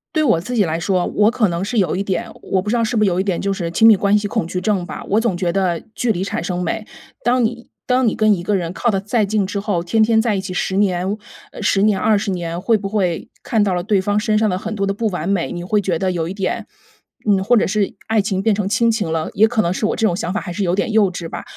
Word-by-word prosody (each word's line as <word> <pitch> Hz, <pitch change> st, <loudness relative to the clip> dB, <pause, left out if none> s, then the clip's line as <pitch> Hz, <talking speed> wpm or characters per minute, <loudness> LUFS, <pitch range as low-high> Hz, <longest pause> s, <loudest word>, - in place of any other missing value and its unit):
对 310 Hz, -, +3 dB
我 225 Hz, -, +3 dB
自 245 Hz, +9 st, -5 dB
己 215 Hz, -, +4 dB
来 165 Hz, -2 st, -1 dB
说， 180 Hz, 0 st, 0 dB
我 210 Hz, +1 st, +3 dB
可 225 Hz, -4 st, +1 dB
能 170 Hz, +1 st, -2 dB
是 235 Hz, +3 st, -3 dB
有 185 Hz, -6 st, +2 dB
一 190 Hz, -, -1 dB
点 195 Hz, -2 st, -3 dB
我 190 Hz, -, 0 dB
不 210 Hz, -, -5 dB
知 235 Hz, -, +1 dB
道 -, -, +1 dB
是 230 Hz, -, -2 dB
不 215 Hz, -, +3 dB
是 -, -, +3 dB
有 180 Hz, 0 st, 0 dB
一 -, -, +1 dB
点 190 Hz, -3 st, -1 dB
就 200 Hz, -, -1 dB
是 175 Hz, -3 st, -3 dB
亲 200 Hz, +7 st, +3 dB
密 220 Hz, -2 st, +8 dB
关 200 Hz, +2 st, +3 dB
系 205 Hz, 0 st, -2 dB
恐 165 Hz, -, -1 dB
惧 180 Hz, +1 st, -3 dB
症 190 Hz, -2 st, 0 dB
吧， -, -, -7 dB
我 210 Hz, -, +3 dB
总 225 Hz, -5 st, 0 dB
觉 175 Hz, -1 st, -1 dB
得 175 Hz, -2 st, 0 dB
距 235 Hz, 0 st, 0 dB
离 185 Hz, 0 st, -2 dB
产 195 Hz, -, -3 dB
生 180 Hz, +1 st, -3 dB
美。 215 Hz, +5 st, -3 dB, 0.3 s
当 245 Hz, +2 st, +2 dB
你 235 Hz, +1 st, -3 dB, 0.2 s
当 255 Hz, -1 st, +2 dB
你 215 Hz, -, +1 dB
跟 215 Hz, -1 st, +4 dB
一 180 Hz, -, -2 dB
个 200 Hz, +4 st, 0 dB
人 170 Hz, -3 st, -2 dB
靠 235 Hz, +6 st, -1 dB
得 195 Hz, -3 st, 0 dB
再 210 Hz, +2 st, +1 dB
近 205 Hz, 0 st, 0 dB
之 200 Hz, +2 st, -3 dB
后， 200 Hz, -4 st, -1 dB
天 220 Hz, +6 st, +1 dB
天 220 Hz, 0 st, +4 dB
在 220 Hz, -2 st, 0 dB
一 -, -, -1 dB
起 190 Hz, -1 st, -5 dB
10 190 Hz, +1 st, -1 dB
年 190 Hz, 0 st, +1 dB, 0.4 s
10 200 Hz, -2 st, +2 dB
年、 205 Hz, -2 st, +3 dB
20 210 Hz, 0 st, +1 dB
年 170 Hz, -1 st, -3 dB
会 225 Hz, +3 st, +3 dB
不 200 Hz, -1 st, -5 dB
会 190 Hz, -5 st, -1 dB
看 225 Hz, -, +1 dB
到 200 Hz, -2 st, +2 dB
了 175 Hz, -1 st, -1 dB
对 205 Hz, +1 st, +2 dB
方 205 Hz, +1 st, 0 dB
身 215 Hz, 0 st, +1 dB
上 215 Hz, 0 st, +2 dB
的 180 Hz, -, -1 dB
很 220 Hz, +3 st, -5 dB
多 200 Hz, -2 st, -1 dB
的 195 Hz, -, 0 dB
不 220 Hz, +3 st, -1 dB
完 180 Hz, -5 st, -3 dB
美， 195 Hz, -3 st, 0 dB
你 175 Hz, -1 st, -5 dB
会 210 Hz, +3 st, +1 dB
觉 180 Hz, -4 st, -1 dB
得 190 Hz, -1 st, 0 dB
有 165 Hz, -1 st, -2 dB
一 -, -, -4 dB
点 195 Hz, -1 st, -3 dB, 0.6 s
嗯， 195 Hz, -2 st, +3 dB
或 240 Hz, +4 st, +4 dB
者 -, -, +3 dB
是 205 Hz, 0 st, -1 dB
爱 220 Hz, -1 st, +2 dB
情 195 Hz, -1 st, -2 dB
变 220 Hz, -, +3 dB
成 200 Hz, -1 st, -1 dB
亲 230 Hz, +2 st, +3 dB
情 210 Hz, -7 st, -2 dB
了， 160 Hz, -1 st, -2 dB
也 220 Hz, +2 st, +5 dB
可 225 Hz, -1 st, +1 dB
能 170 Hz, +1 st, 0 dB
是 190 Hz, -, -5 dB
我 -, -, -1 dB
这 225 Hz, -, 0 dB
种 180 Hz, -5 st, +2 dB
想 180 Hz, -1 st, -3 dB
法 205 Hz, -, -1 dB
还 175 Hz, -, -6 dB
是 205 Hz, -, -4 dB
有 175 Hz, -1 st, +1 dB
点 200 Hz, +3 st, -1 dB
幼 210 Hz, -3 st, +3 dB
稚 170 Hz, -2 st, -6 dB
吧。 -, -, -7 dB
200 Hz, 320 characters per minute, -19 LUFS, 180-215 Hz, 0.6 s, 密